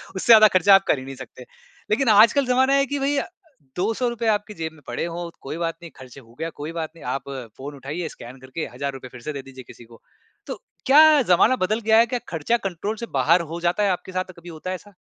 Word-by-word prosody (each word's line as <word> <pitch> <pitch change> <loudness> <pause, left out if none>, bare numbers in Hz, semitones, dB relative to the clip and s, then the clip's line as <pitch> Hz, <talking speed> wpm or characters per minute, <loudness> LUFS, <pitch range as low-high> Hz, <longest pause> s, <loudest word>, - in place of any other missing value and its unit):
उससे 190 - -4
ज़्यादा 215 -1 +9
ख़र्चा 195 +2 +6
आप 195 - +4
कर 135 - +2
ही 130 - -9
नहीं 135 0 -8
सकते, 130 -1 -12 0.5
लेकिन 240 +2 +2
आजकल 230 +6 +5
ज़माना 260 +2 +2
है 275 0 +3
कि 285 +1 -3
भई 280 +1 0
अ, - - 0 0.5
₹200 225 +4 -1
आपकी 210 0 -1
जेब 160 0 -3
में 155 - -19
पड़े 120 +7 -3
हो 170 0 -5
कोई 145 +4 -6
बात 165 -1 -2
नहीं, 170 - -11
ख़र्च 130 0 -13
हो 115 -3 -19
गया 165 0 -3
कोई 155 +2 -5
बात 160 -1 -4
नहीं, 165 - -13
आप 135 +2 -4 0.3
फ़ोन 145 +2 -8
उठाइए 150 +5 -5
स्कैन 125 +2 -11
करके 130 +5 -6
हज़ार 140 -1 -4
रुपये 130 -1 -10
फिर 120 - -10
से 150 - -2
दे 140 - -6
दीजिए 130 -1 -11
किसी 120 - -14
को। 115 - -16 0.5
तो - - -4 0.3
क्या 290 +3 +7 0.3
ज़माना 215 +8 +5
बदल 215 +4 -1
गया 220 - +6
है? 230 - +6
क्या - - -1
ख़र्चा 165 +9 0
कंट्रोल 195 +5 -4
से 235 - -5
बाहर 170 +7 +4
हो 170 - -4
जाता 205 +4 +1
है, 200 - +2
आपके 185 +1 -5
साथ 185 0 -3
कभी 175 +1 -12
होता 165 +2 -7
है 185 - -2
ऐसा? 205 -1 -18
175 Hz, 250 wpm, -23 LUFS, 140-215 Hz, 0.5 s, ज़्यादा